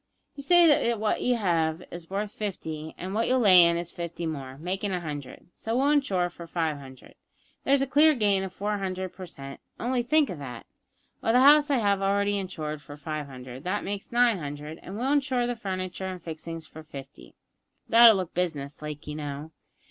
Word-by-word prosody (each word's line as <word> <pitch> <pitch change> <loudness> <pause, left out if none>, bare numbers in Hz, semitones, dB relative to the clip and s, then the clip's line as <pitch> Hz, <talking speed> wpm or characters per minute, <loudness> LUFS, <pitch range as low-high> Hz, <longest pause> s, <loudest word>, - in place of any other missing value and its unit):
You 285 - -7
say 295 -6 +5
what 215 -1 -1
you 250 - +2
have 165 -6 0
is 170 -1 -9
worth 200 +2 -2
fifty, 160 -7 -5
and 185 +2 -5
what 225 +2 +1
you'll 255 - +3
lay 185 -5 +8
in 170 0 +3
is 170 0 -4
fifty 170 0 -5
more, 135 -4 -5
makin' 190 +5 -3
a 180 - -1
hundred, 145 -3 -7
so 225 +2 -2
we'll 275 +3 +3
insure 200 -12 +2
for 170 -1 -10
five 160 -3 -1
hundred; 130 -2 -13 0.5
there's 275 0 +4
a - - +1
clear 300 +3 +5
gain 205 -5 +2
of 190 - -5
four 205 +2 -2
hundred 185 -1 -4
per 185 -1 -9
cent, 135 -3 -9 0.2
only 245 +1 0
think 300 +2 +2
of 170 - -7
that! 125 -5 -8 0.6
Well, 225 - +1
the 250 - +6
house 290 +2 +7
I 280 - +3
have 200 -4 +1
already 200 +1 +1
insured 155 -6 -5
for 145 +1 -11
five 150 0 -5
hundred, 130 0 -10
that 195 +3 -1
makes 200 0 -5
nine 240 -4 +3
hundred, 150 +1 -7
and 195 +3 -8
we'll 260 +4 0
insure 265 -4 +1
the 245 0 -2
furniture 190 -3 -4
and 185 -1 -5
fixings 165 0 -7
for 160 - -11
fifty; 140 -2 -11 0.5
that'll 230 -1 +8
look 185 -3 -3
business 150 -6 -3
like, 150 0 -7
you 150 - -5
know. 150 +1 -6
185 Hz, 200 wpm, -27 LUFS, 155-225 Hz, 0.6 s, lay